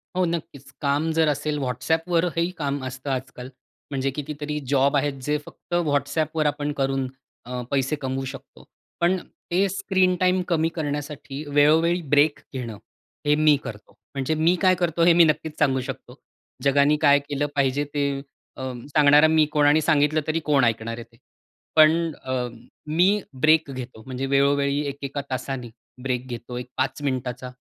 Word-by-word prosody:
हो, 185 - +2
नक्कीच. 160 -5 -5
काम 145 +3 +1
जर 160 0 +2
असेल 150 +1 -1
WhatsAppवर 160 +7 0
हेही 170 +1 +1
काम 140 -2 -2
असतं 130 +2 -6
आजकाल. 130 -1 -5 0.4
म्हणजे 135 0 -1
कितीतरी 150 +1 -4
जॉब 140 0 +3
आहेत, 145 +1 0
जे 150 +3 0
फक्त - - -12
WhatsAppवर 150 +2 0
आपण 145 0 0
करून 135 -1 0 0.4
अ, 125 0 -4
पैसे 135 +1 +1
कमवू 135 0 -2
शकतो. 135 +1 -10 0.4
पण 175 +2 +3 0.3
ते 190 +3 +3
स्क्रीन 190 -1 +1
टाईम 185 0 +3
कमी 165 -2 +1
करण्यासाठी 145 -2 -4
वेळोवेळी 160 +4 +4
ब्रेक 145 +1 +4
घेणं, 120 -5 -5 0.5
हे 145 0 +4
मी 155 0 +5
करतो. 105 -1 -9 0.2
म्हणजे 135 +2 -1
मी 165 +3 +3
काय 185 -1 +5
करतो, 170 -2 0
हे 175 - +7
मी 170 0 +7
नक्कीच 155 0 0
सांगू 135 -3 +2
शकतो. 130 -2 -8 0.5
जगाने 140 +2 +4
काय 145 -2 +6
केलं 145 0 0
पाहिजे 140 0 +1
ते 145 -1 0 0.5
अ, - - -7 0.3
सांगणारा 145 +1 +6
मी 155 -1 +4
कोण 150 -1 +3
आणि 150 +2 +4
सांगितलं 150 0 +2
तरी 155 +1 0
कोण 145 -3 +3
ऐकणार 115 0 -1
आहे 120 - -7
ते. 115 0 -25 0.6
पण 160 +1 +5
अ, 130 - -3 0.5
मी 165 +4 +3 0.4
ब्रेक 155 -2 +4
घेतो. 125 -4 -8
म्हणजे 130 0 -4
वेळोवेळी 140 +1 +2
एका-एका 140 0 -4
तासाने 130 -1 -4 0.3
ब्रेक 130 -1 -2
घेतो 120 0 -6
एक 125 0 -6
5 135 +2 -1
मिनिटाचा 130 -2 -3
145 Hz, 160 wpm, -24 LUFS, 135-155 Hz, 0.6 s, हे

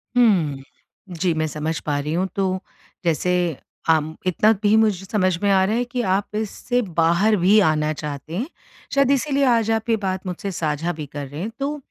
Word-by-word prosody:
हुँ। 175 - +3 0.6
जी 180 -3 +2
मैं 155 - +1
समझ 155 +2 -3
पा 145 -1 -2
रही 150 +2 -3
हूँ। 180 +3 0
तो 190 -1 0 0.5
जैसे 170 +2 +1 0.6
आम 160 -1 +2
इतना 195 +5 +4
भी 205 +1 +4
मुझे 210 -4 +2
समझ 185 -4 +1
में 200 - +3
आ 190 -1 +4
रहा 210 +3 0
है 245 - +1
कि 245 0 -3
आप 205 +2 -2
इससे 220 +3 -1 0.2
बाहर 170 +7 +4
भी 205 +4 +6
आना 155 0 +1
चाहते 150 +1 -6
हैं। 245 +7 -2 0.5
शायद 275 -1 +3
इसीलिए 280 0 +1
आज 230 -3 +3
आप 225 +1 -1
ये 225 - +4
बात 190 -2 -3
मुझसे 185 +2 -4
साझा 160 -1 -1
भी 155 -2 -6
कर 145 0 -7
रहे 145 +4 -7
हैं। 210 - -3
तो 285 +2 -2
185 Hz, 195 wpm, -22 LUFS, 155-220 Hz, 0.6 s, भी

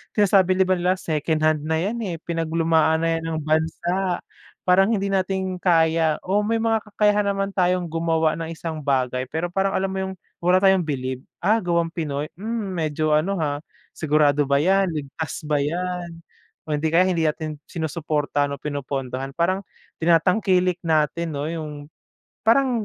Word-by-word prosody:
sinasabi 195 -3 +4
ba 185 0 +2
nila 180 +1 +1
second-hand 155 -2 0
na 160 +1 0
yan 210 +7 -2
eh, 180 -5 -3
pinaglumaan 165 -1 +1
na 165 0 +1
yan - - -9
ng 160 -1 -2
bansa, 170 +4 0 0.4
parang 190 +1 +4
hindi 200 -3 0
natin 190 -1 -1
kaya 160 -3 +3
o 195 +3 +1
may 225 0 +1
mga 225 -1 +2
kakayahan 210 0 +2
naman 195 0 -2
tayong 180 -1 +1
gumawa 165 -1 +1
ng 165 0 -4
isang 160 -1 -5
bagay 130 -3 0
pero 160 +5 -3
parang 195 +1 0
alam 190 0 0
mo 190 - -3
yung 190 0 -3 0.3
wala 180 +2 +3
tayong 190 -2 +5
bilib, 130 -4 -3 0.2
ah, 215 +5 +4
gawang 170 -3 0
Pinoy, 150 -3 -3
mm, 220 -1 -3
medyo 155 -3 -1
ano, 155 +6 +2
ha, 145 -4 -1 0.3
sigurado 150 -2 +2
ba 140 +1 +2
yan? 195 +2 +3
Ligtas 150 +2 -5
ba 150 -1 0
yan 175 +4 -2 0.6
o 155 - -7
hindi 150 +1 0
kaya 165 +3 +4
hindi 175 -3 +1
natin 155 0 -3
sinusuportahan 150 -3 -1
o 140 - -8
pinupondohan 135 -2 -4
,parang 185 +5 0 0.3
tinatangkilik 180 +2 +3
natin 160 +1 +1
'no 145 +2 -3
yung, 160 -2 -4 0.8
parang 245 0 +4
165 Hz, 160 wpm, -23 LUFS, 155-185 Hz, 0.8 s, tayong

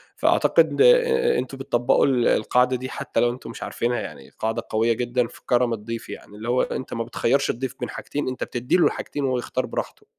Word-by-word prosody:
فأعتقد - - +3
آآ، 475 -1 +5
أنتم 135 - -5
بتطبّقوا 125 -2 +2
ال 125 -4 +2
القاعدة 125 +4 +2
دي 130 +1 -5
حتى 140 - -3
لو 120 - +4
أنتم 125 - -9
مش - - -7
عارفينها 120 +1 -1
يعني، 70 -3 -8
قاعدة 110 0 -1
قوية 115 +2 +2
جدًا 120 +1 0
في - - -16
كرم 120 -1 +2
الضيف 115 +1 -6
يعني، 105 - -10
اللي 110 +3 -6
هو 125 - +3
أنت 130 - -4
ما 115 - -2
بتخيّرش 125 +3 0
الضيف 130 +1 -3
بين - - -4
حاجتين، 145 -1 -4
أنت 130 - -3
بتدّي 125 +1 -1
له 175 - +4
الحاجتين 145 - -4
وهو 130 -2 +1
يختار 120 - -2
براحته. - - -5
125 Hz, 205 wpm, -23 LUFS, 115-135 Hz, -, آآ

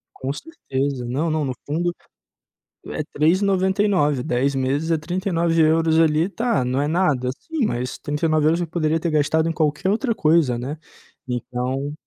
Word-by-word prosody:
Com 130 +1 -3
certeza. 140 - -4
Não, 140 +7 -1
não, 155 -1 0
no 130 - -2
fundo 170 +4 -1 1.0
é - - -3
3,99€, 185 -3 +2
10 130 +3 0
meses 135 +5 -1
é 165 - +3
39€ 165 -2 +1
ali. 160 +1 +3
Tá, 225 - 0
não 130 +3 0
é 145 - 0
nada, 150 -7 +1
sim, 320 -6 -2
mas 125 - -3
39€ 155 +2 +1
eu 170 - -2
poderia 160 -1 0
ter 170 - -1
gastado 160 +1 +2
em - - +1
qualquer 155 +4 0
outra 230 +4 +1
coisa, 155 - +2
né. 135 +6 -5 0.5
Então 125 +3 -3
155 Hz, 150 wpm, -22 LUFS, 140-170 Hz, 1.0 s, é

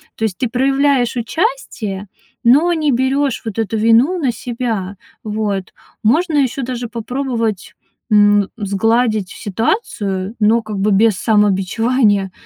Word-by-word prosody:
То - - -5
есть 210 -4 -1
ты 250 - -1
проявляешь 270 0 +1
участие, 235 - -3 0.4
но 285 +9 +5
не 310 -3 +1
берёшь 265 +1 0
вот 220 -1 -4
эту 225 0 -1
вину 230 +11 +3
на 270 -6 +1
себя. 230 -5 -4 0.3
Вот. 210 -3 -3 0.3
Можно 315 +9 +2
ещё 270 -1 0
даже 245 -1 -4
попробовать, 230 -3 -3 0.4
м, 205 -1 +4
сгладить 215 0 0
ситуацию, 205 - -2
но 220 +2 +3
как 215 -2 -6
бы 205 +2 +1
без 210 +1 +4
самобичевания. 205 +1 +1
225 Hz, 125 wpm, -17 LUFS, 205-255 Hz, 0.4 s, но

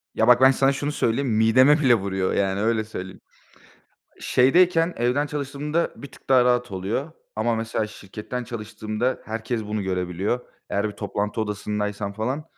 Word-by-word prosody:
Ya, - - +2
bak 125 0 +6
ben 130 0 +8
sana 135 +1 +3
şunu 145 +2 -2
söyleyeyim, 135 -1 0
mideme 120 +7 +5
bile 130 -5 +5
vuruyor, 95 -2 -1
yani, 95 0 0
öyle 110 0 +1
söyleyeyim. 95 -4 -8 1.0
Şeydeyken 165 +5 +3
evden 125 +5 +1
çalıştığımda 150 +3 -2
bir 140 - -11
tık - - -18
daha 130 -2 +5
rahat 125 -2 +1
oluyor. 105 - -3 0.2
Ama, 115 +2 +1
mesela, 110 -1 -2
şirketten 105 +4 -7
çalıştığımda 110 +1 -3
herkes 110 +1 -3
bunu 105 0 -3
görebiliyor. 95 +4 -2 0.3
Eğer 100 +2 0
bir 105 - -9
toplantı 105 +1 -3
odasındaysam 105 -1 -3
falan, 125 +9 -3
115 Hz, 155 wpm, -24 LUFS, 105-130 Hz, 1.0 s, ben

